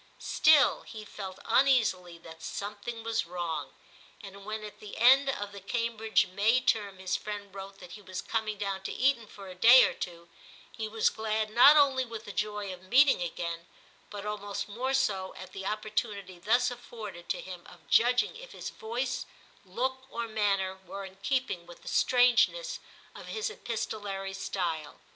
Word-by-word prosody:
Still 305 -2 +4
he 215 -1 -10
felt 190 -3 -7
uneasily 225 -9 +3
that 165 -1 -13
something 210 +6 -5
was 225 -4 -1
wrong; 165 -6 -4 0.5
and 195 0 -10
when 215 0 -4
at 210 -1 -9
the 210 - -9
end 265 +4 +6
of 205 -6 -3
the 200 - -9
Cambridge 225 +1 +1
May 210 +7 +2
term 205 -6 0
his 185 0 -2
friend 205 -2 -6
wrote 195 0 -8
that 180 -2 -12
he 205 - -10
was 185 -2 -6
coming 220 -2 -2
down 195 -1 -3
to - - -5
Eton 255 -4 +1
for 200 -1 -11
a 185 - -8
day 235 +8 +8
or - - +2
two, 170 -1 -7 0.4
he 220 - -4
was 220 0 +2
glad 220 0 -2
not 265 +7 +8
only 270 -3 +4
with 230 -2 -8
the 205 - -6
joy 210 -1 -3
of 180 - -12
meeting 260 +4 +5
again, 170 0 -4 0.4
but 205 -1 -7
almost 205 -1 -4
more 255 +6 -1
so 195 -8 0
at 185 - -9
the 195 0 -5
opportunity 210 -3 -3
thus 240 +7 +2
afforded 225 -7 -9
to - - -1
him 180 -2 -8
of - - -16
judging 245 - +3
if - - -11
his - - -6
voice, 240 +4 -3 0.4
look, 260 +7 -3
or 235 -2 -4
manner 195 -3 0
were 195 +2 -7
in 190 0 -12
keeping 200 -4 -2
with 175 - -13
the - - -15
strangeness 255 - +3 0.3
of - - -11
his 435 0 -3
epistolary 205 - -4
style. 165 -6 -3
210 Hz, 175 wpm, -30 LUFS, 190-235 Hz, 0.5 s, day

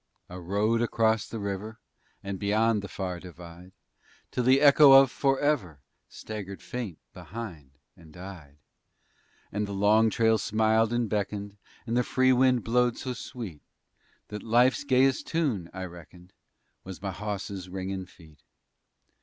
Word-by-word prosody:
_ - - -11
I - - -6
rode 105 +6 0
across 115 -2 +1
the 115 - -6
river 100 +2 -5 0.5
And 100 -1 -5
beyond 105 +1 +1
the 100 - -7
far 90 -3 -5
divide, 90 0 -12 0.6
Till 125 - -1
the 130 +2 +5
echo 140 -1 +7
of 135 -1 +7
"forever" 135 - 0 0.3
Staggered 100 -3 -7
faint 115 -9 -5 0.2
behind 85 - -9 0.2
and 80 -2 -17
died. 85 -5 -11 1.0
For 105 - -3
the 100 -1 -2
long 105 +3 +4
trail 110 0 +2
smiled 110 +1 +2
and 120 -1 0
beckoned 100 -1 -3 0.3
And 115 0 -2
the 125 - +4
free 130 +2 +3
wind 125 -2 +3
blowed 120 +1 +1
so 130 - -4
sweet, 115 - -8 0.7
That 105 -1 -6
life's 120 +3 +3
gayest 135 -1 +2
tune, 130 - -1
I 95 0 -6
reckoned, 90 +1 -14 0.5
Was 95 -1 -9
my 100 0 -4
hawse's 100 -1 -5
ringin' 95 0 -5
feet. 80 -5 -19
105 Hz, 145 wpm, -27 LUFS, 95-120 Hz, 1.0 s, echo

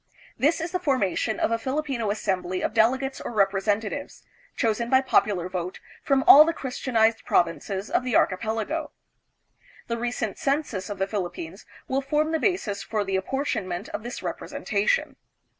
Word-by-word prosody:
This 310 +5 +2
is 330 +1 -3
the 365 - -1
formation 250 - 0
of - - +1
a 230 - +1
Filipino 260 -3 -2
assembly 185 -3 -1
of - - -1
delegates 260 +4 +2
or - - -5
representatives, 205 +5 0 0.3
chosen 230 +1 0
by 260 - +6
popular 200 -8 +2
vote 180 0 -4 0.2
from 270 -1 +2
all 295 - +11
the 330 +1 -1
Christianized 230 -4 0
provinces 190 +4 0
of - - +2
the 250 -3 -1
archipelago. 225 - 0 1.0
The 235 0 -3
recent 240 -3 -3
census 275 -9 -1
of 205 - -4
the 195 - +1
Philippines 190 -2 -5 0.2
will 270 +1 0
form 300 +3 0
the 320 - +1
basis 230 - 0
for 210 +1 -2
the 195 -1 -2
apportionment 190 -3 -2
of - - -5
this 240 +2 -7
representation. - - -1
225 Hz, 155 wpm, -25 LUFS, 195-275 Hz, 1.0 s, all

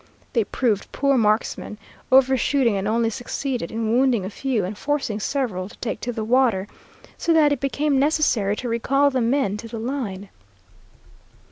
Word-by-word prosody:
They 230 -4 +2
proved 220 -5 -1
poor 275 -1 +1
marksmen, 215 -2 0 0.3
overshooting, 265 -2 +3
and 195 +1 -2
only 225 +1 +1
succeeded 250 +2 -3
in 225 -1 -2
wounding 245 -4 +2
a 190 - -5
few 245 -5 -1
and 195 +4 -5
forcing 270 -4 -2
several 210 -7 -2
to - - -15
take 225 - -4
to 245 - -2
the 225 -2 -4
water, 230 -4 +2 0.5
so 335 - +2
that 305 -2 +5
it 285 - 0
became 280 0 0
necessary 270 -9 +2
to 245 - -5
recall 275 +5 +2
the 260 -1 0
men 230 -4 +1
to 230 - -8
the 230 0 -7
line. 220 -5 -4
240 Hz, 165 wpm, -23 LUFS, 215-270 Hz, 0.5 s, that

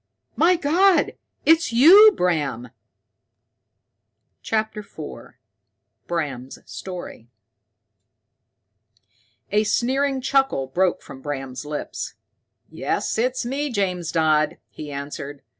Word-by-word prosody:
My 360 +2 +4
God, 350 +4 +3 0.3
it's 325 -5 +4
you, 360 - +8
Bram!" 145 -9 -1 1.7
CHAPTER 220 -1 -2
IV 160 -7 -10 0.7
Bram's 140 -7 -4
Story 180 -10 -8 2.2
A 210 +1 +3
sneering 265 +5 0
chuckle 270 - +1
broke 175 +7 0
from 135 - -11
Bram's 135 -1 -5
lips. 150 0 -5 0.6
"Yes, - - -2
it's 250 +1 0
me, 280 +4 -2
James 185 -7 -2
Dodd," 155 -2 +2
he 150 -1 -8
answered. 140 0 -7
185 Hz, 90 wpm, -22 LUFS, -, 2.2 s, you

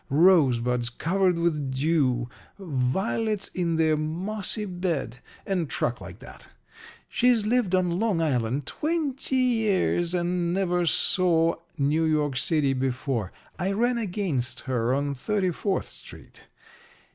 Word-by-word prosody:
Rosebuds 125 -7 +3
covered 180 +7 +1
with 155 -5 0
dew 130 -5 +1 0.3
violets 190 - -1
in 170 -2 -1
their 160 -1 +3
mossy 190 +7 -2
bed 175 - -3 0.3
and 180 -6 -1
truck 120 0 -2
like - - -9
that. - - -13 0.6
She's 240 -3 +2
lived 220 -5 +2
on 180 -1 +1
Long 215 -6 +1
Island 130 -3 0
twenty 295 - -2
years 215 -8 +1
and 175 0 0
never 180 -2 +1
saw 165 0 +2 0.2
New 150 +3 +1
York 150 -3 +1
City 145 0 +2
before. 130 -5 -2 0.3
I 190 +3 0
ran 240 +3 +1
against 180 - -2
her 125 -3 -1
on 140 +1 0
Thirty 190 - -1
fourth 195 +3 -2
Street. - - -13
170 Hz, 125 wpm, -26 LUFS, 140-195 Hz, 0.6 s, Rosebuds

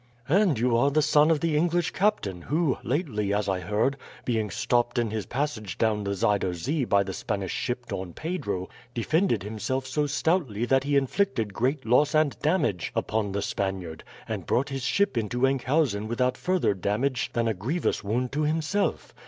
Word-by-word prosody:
"And 180 - +4
you 120 +1 +2
are 140 +4 +4
the 155 +2 +2
son 150 +1 +5
of 160 -3 +2
the 165 -2 +1
English 170 +2 +1
captain 180 - 0
who, 150 - 0
lately, 120 - -1
as 105 0 0
I 95 -1 0
heard, 105 +9 0 0.3
being 110 -3 0
stopped 120 +3 0
in 115 -3 +1
his 110 -1 -3
passage 120 - -3
down 110 -2 +1
the 100 0 -1
Zuider 100 -3 +1
Zee 135 - -1
by 100 -3 +3
the 95 -1 -5
Spanish 100 -3 -3
ship 125 0 -3
Don 95 -5 -5
Pedro, 115 - -3 0.3
defended 120 - +1
himself 110 +5 -3
so 150 +2 0
stoutly 145 - 0
that 135 +2 +2
he 145 0 +1
inflicted 130 - 0
great 130 +6 0
loss 145 +6 +3
and 155 -2 +3
damage 145 - 0
upon 105 -2 -1
the 100 +1 -2
Spaniard, 95 -5 -3 0.2
and - - -4
brought 135 +4 +1
his 135 -1 -4
ship 195 - +1
into 120 +4 0
Enkhuizen 135 -5 +1
without 125 +2 0
further 185 - +1
damage 110 +7 -1
than 115 -1 +1
a 110 - +1
grievous 125 - -1
wound 120 +5 -1
to 150 - -1
himself. 160 +6 0
125 Hz, 180 wpm, -26 LUFS, 105-150 Hz, 0.3 s, son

